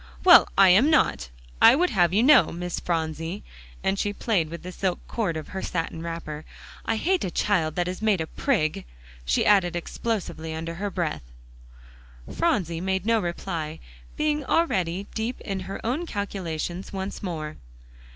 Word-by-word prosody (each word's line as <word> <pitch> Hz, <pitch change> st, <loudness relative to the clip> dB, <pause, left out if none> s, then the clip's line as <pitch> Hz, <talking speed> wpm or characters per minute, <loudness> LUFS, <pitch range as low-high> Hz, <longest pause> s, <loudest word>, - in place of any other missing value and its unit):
well, 355 Hz, -1 st, +9 dB
I 195 Hz, -1 st, +8 dB
am 210 Hz, +12 st, +6 dB
not, 295 Hz, -, +2 dB, 0.3 s
I -, -, +9 dB
would 360 Hz, +5 st, +2 dB
have 175 Hz, -5 st, +3 dB
you 210 Hz, +5 st, +3 dB
know, 290 Hz, +1 st, +6 dB
Miss 175 Hz, +1 st, -4 dB
Phronsie," 165 Hz, +2 st, -3 dB, 0.4 s
and 195 Hz, +1 st, 0 dB
she 205 Hz, -, -1 dB
played 195 Hz, -7 st, 0 dB
with 170 Hz, +1 st, -8 dB
the 180 Hz, -, -6 dB
silk 185 Hz, 0 st, -1 dB
cord 195 Hz, -9 st, -2 dB
of 155 Hz, -, -7 dB
her 190 Hz, -, -5 dB
satin 165 Hz, -1 st, -3 dB
wrapper. 165 Hz, -2 st, -6 dB, 0.4 s
"I 225 Hz, -, 0 dB
hate 365 Hz, +11 st, +1 dB
a -, -, -1 dB
child 165 Hz, -5 st, 0 dB
that 175 Hz, -1 st, 0 dB
is 185 Hz, +2 st, -5 dB
made 215 Hz, -4 st, +2 dB
a 160 Hz, -, -1 dB
prig!" 160 Hz, -, -1 dB, 0.4 s
she -, -, +1 dB
added 190 Hz, -4 st, +4 dB
explosively 170 Hz, -4 st, -3 dB
under 165 Hz, +1 st, -4 dB
her 200 Hz, +4 st, -3 dB
breath. 170 Hz, -, -2 dB, 1.1 s
Phronsie 180 Hz, -, 0 dB
made 190 Hz, 0 st, -1 dB
no 230 Hz, 0 st, +3 dB
reply, 170 Hz, -3 st, -4 dB, 0.4 s
being 300 Hz, -1 st, 0 dB
already 195 Hz, -, 0 dB
deep 230 Hz, +3 st, -3 dB
in 195 Hz, -2 st, -4 dB
her 190 Hz, +1 st, -6 dB
own 290 Hz, +9 st, -1 dB
calculations 185 Hz, -, -4 dB
once 195 Hz, 0 st, -5 dB
more. 155 Hz, -5 st, -5 dB
185 Hz, 165 wpm, -25 LUFS, 165-215 Hz, 1.1 s, well